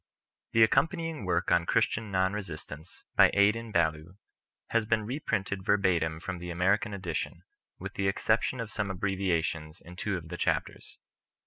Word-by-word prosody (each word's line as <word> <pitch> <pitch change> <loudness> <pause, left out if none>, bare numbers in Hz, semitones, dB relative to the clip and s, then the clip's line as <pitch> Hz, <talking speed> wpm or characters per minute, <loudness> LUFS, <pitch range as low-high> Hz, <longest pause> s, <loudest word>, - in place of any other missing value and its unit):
The 115 - +6
accompanying 160 - +1
Work 90 -1 0
on 85 -1 +3
Christian 110 -1 +1
Non 95 0 +1
Resistance, 80 -5 -8
by - - +7
Adin 105 +3 +3
Ballou, 80 +1 0 0.5
has 115 -2 +1
been 110 -1 +1
reprinted 105 -7 -2
verbatim 90 -6 +2
from 90 +1 -5
the 90 0 -6
American 95 +5 +1
Edition, 90 -5 -4 0.3
with - - -7
the 100 0 -1
exception 110 +5 +1
of 115 -1 -4
some 105 -4 -2
abbrevia 95 -3 0
tions 80 -1 -5
in 90 +1 -13
two 95 +1 -2
of 80 -2 -9
the - - -5
Chapters. - - -2
95 Hz, 155 wpm, -29 LUFS, 85-105 Hz, 0.5 s, by